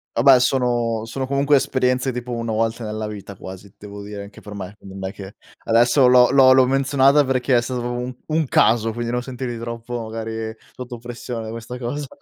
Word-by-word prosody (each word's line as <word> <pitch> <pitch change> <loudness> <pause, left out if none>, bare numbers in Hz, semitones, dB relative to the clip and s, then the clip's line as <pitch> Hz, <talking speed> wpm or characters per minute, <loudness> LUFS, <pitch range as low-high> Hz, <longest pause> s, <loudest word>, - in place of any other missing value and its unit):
Vabbè, 130 +2 +6
sono 120 -3 0
sono 130 +3 -4
comunque 140 +1 +2
esperienze 130 -1 +1
tipo 125 0 -6
1 115 -1 -3
volta 115 +1 -1
nella 110 0 -4
vita 100 -2 -8
quasi, 95 +2 -11
devo 100 0 -10
dire 100 -1 -7
anche 100 - -13
per 105 - -10
me, 100 0 -7
quindi 95 0 -12
non 95 - -3
è - - -10
che 100 -1 -10 0.3
adesso 120 +3 +4
l'ho 125 0 +6
l'ho 135 -1 +6
l'ho 130 -1 +6
menzionata 135 +2 +3
perché 130 -1 +1
è 120 - +4
stato 125 0 -4
proprio 120 0 -3
un 125 0 -5
un 155 0 +1
caso, 115 -1 +3
quindi 120 +1 -4
non 125 0 -1
sentirti 125 -2 -5
troppo 115 +1 -5
magari 110 0 -5 0.2
sotto 125 -1 -8
pressione 120 0 -6
da 110 - -6
questa 115 +2 -7
cosa. 135 +4 -4
120 Hz, 205 wpm, -21 LUFS, 110-130 Hz, 0.3 s, Vabbè